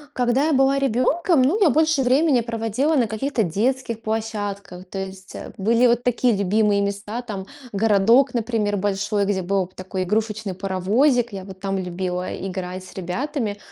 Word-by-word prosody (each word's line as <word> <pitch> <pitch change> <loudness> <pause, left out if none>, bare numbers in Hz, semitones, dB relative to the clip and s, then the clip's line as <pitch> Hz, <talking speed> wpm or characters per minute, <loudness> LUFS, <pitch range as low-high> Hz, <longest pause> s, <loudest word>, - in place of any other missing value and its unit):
Когда 250 +3 +2
я 315 - +2
была 270 +1 +3
ребенком, 275 +5 +2
ну, 315 +12 +2
я 345 -9 +5
больше 315 -2 +2
времени 265 +1 +3
проводила 230 +6 -1
на 240 -5 +2
каких-то 235 +4 -1
детских 230 +5 -1
площадках, 205 -4 -4
то 195 +1 -6
есть, 190 0 -11
а, - - -7
были 230 +5 +3
вот 240 0 +2
такие 245 -2 +2
любимые 200 +1 +2
места, 205 +4 -3
там 200 -4 -6 0.2
городок, 225 +5 +3
например, 220 -3 0
большой, 205 +1 0
где 195 -1 0
была 190 +1 0
п 185 - -20
такой 185 0 -4
игрушечный 215 0 -2
паровозик. 210 +7 +1
Я 190 -1 -6
вот 190 -1 -11
там 195 0 -2
любила 180 0 -3
играть 185 -1 -5
с - - -13
ребятами. 210 - -3
215 Hz, 165 wpm, -22 LUFS, 195-250 Hz, 0.2 s, я